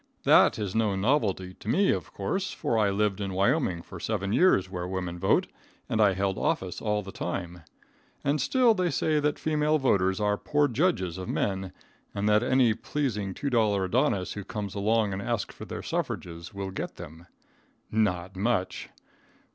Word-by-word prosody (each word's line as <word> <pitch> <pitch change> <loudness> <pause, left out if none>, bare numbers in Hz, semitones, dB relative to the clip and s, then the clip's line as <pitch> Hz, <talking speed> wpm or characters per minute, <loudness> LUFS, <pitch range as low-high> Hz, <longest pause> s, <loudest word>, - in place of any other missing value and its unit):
That - - +6
is 100 -3 -3
no 110 -3 +1
novelty 95 -4 0
to - - -12
me, 195 - +3
of - - -3
course, 190 0 -2
for 145 -7 -2
I 105 -2 +3
lived 105 0 0
in 100 -1 -3
Wyoming 100 - +1
for 95 - -10
seven 100 0 -2
years 115 - +4
where 90 -1 -5
women 90 -2 -4
vote, 95 - +3 0.4
and 110 - 0
I 100 -2 +5
held 95 0 -1
office 95 -1 -1
all 105 -1 0
the 95 - -8
time. 90 -3 -5 0.6
And 140 +1 +1
still 245 - +4
they 185 -4 0
say 155 -2 +1
that 150 0 0
female 155 0 +1
voters 95 -9 +2
are 105 -1 +1
poor 145 0 +2
judges 120 - 0
of 90 - -6
men, 95 -2 -1 0.4
and 100 +1 -1
that 105 0 +4
any 125 -2 +3
pleasing 105 -7 -3
$2 110 -8 +1
adonis 100 - +1
who 100 - -6
comes 100 0 -5
along 105 0 +1
and 95 - -3
asks 115 -1 -2
for - - -9
their - - -6
suffrages 85 +1 -4
will 100 -2 -5
get - - -5
them. 80 +3 -11 0.6
Not 95 -4 0
much!!! 100 -1 -1
105 Hz, 175 wpm, -27 LUFS, 95-125 Hz, 0.6 s, That